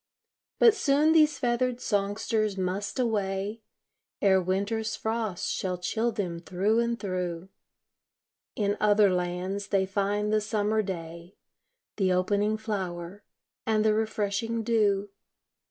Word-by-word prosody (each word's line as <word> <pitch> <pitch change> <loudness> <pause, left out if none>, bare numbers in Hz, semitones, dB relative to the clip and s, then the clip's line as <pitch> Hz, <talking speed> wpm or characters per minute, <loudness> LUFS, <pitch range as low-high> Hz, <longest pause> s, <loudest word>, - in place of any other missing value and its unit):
But 460 -3 +7
soon 295 -5 +3
these 305 -2 +4
feathered 245 0 0
songsters 205 0 -1
must 190 +4 -2
away, 210 -2 -1 0.6
Ere 190 -1 +4
winter's 200 +4 -1
frosts 220 -4 -2
shall 180 -1 -2
chill 220 +6 -1
them 185 -6 -3
thro' 190 +6 0
and 235 0 0
thro'; 180 -2 -3 1.1
In 205 -1 0
other 205 -2 +4
lands 180 +3 -2
they 195 -1 +2
find 205 +2 -1
the 215 - +3
summer 215 0 0
day, 170 -2 -7 0.6
The 190 -3 +2
opening 205 +4 +1
flower, 195 -3 -5 0.4
and 215 -1 +2
the 215 - +4
refreshing 220 +1 -1
dew. 205 -3 +1
205 Hz, 120 wpm, -28 LUFS, 190-220 Hz, 1.1 s, But